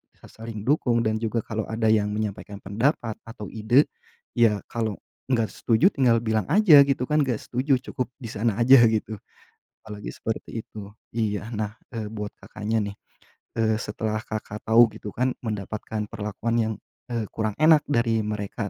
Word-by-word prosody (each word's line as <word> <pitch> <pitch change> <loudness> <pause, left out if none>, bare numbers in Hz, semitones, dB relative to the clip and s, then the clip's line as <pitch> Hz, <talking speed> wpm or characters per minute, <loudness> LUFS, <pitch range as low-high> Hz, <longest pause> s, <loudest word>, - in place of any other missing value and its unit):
sa - - -17
saling 110 -2 -8
dukung 120 -3 +2
dan 110 0 0
juga 115 0 -1
kalau 110 -1 -4
ada 110 -1 +1
yang 105 -2 +3
menyampaikan 105 -1 -5
pendapat 115 +2 -1
atau 105 -3 -8
ide, 115 +6 +3 0.5
ya 105 -4 +3
kalau 110 -3 -1 0.3
gak 115 -4 +1
setuju 125 - +3
tinggal 120 -4 +3
bilang 110 -2 0
aja 170 -2 +7
gitu 135 -2 0
kan, 150 - +3
gak 120 -4 -2
setuju 130 +3 +1 0.2
cukup 125 - -2 0.2
di 115 - -5
sana 110 0 0
aja 130 +2 +8
gitu. 110 -1 -2 0.7
Apalagi 105 -1 -7
seperti 110 0 -5
itu. 100 -2 -9 0.2
Iya, 110 0 -2
nah, 110 +1 -4 0.2
eee, 110 -2 -4
buat 105 -1 -6
Kakaknya 110 +1 -3
nih, 100 0 -5 0.6
eee, 110 -1 +2
setelah 110 +1 -3
Kakak 110 -1 -6
tahu 115 0 +6
gitu 105 - -7
kan 125 +5 0
mendapatkan 105 0 -4
perlakuan 105 +2 -3
yang, 110 0 -1 0.4
eee, 115 -2 -1
kurang 110 -2 -2
enak 155 -1 +6
dari 115 -5 +2
mereka, 105 0 -4
110 Hz, 165 wpm, -25 LUFS, 105-120 Hz, 0.7 s, aja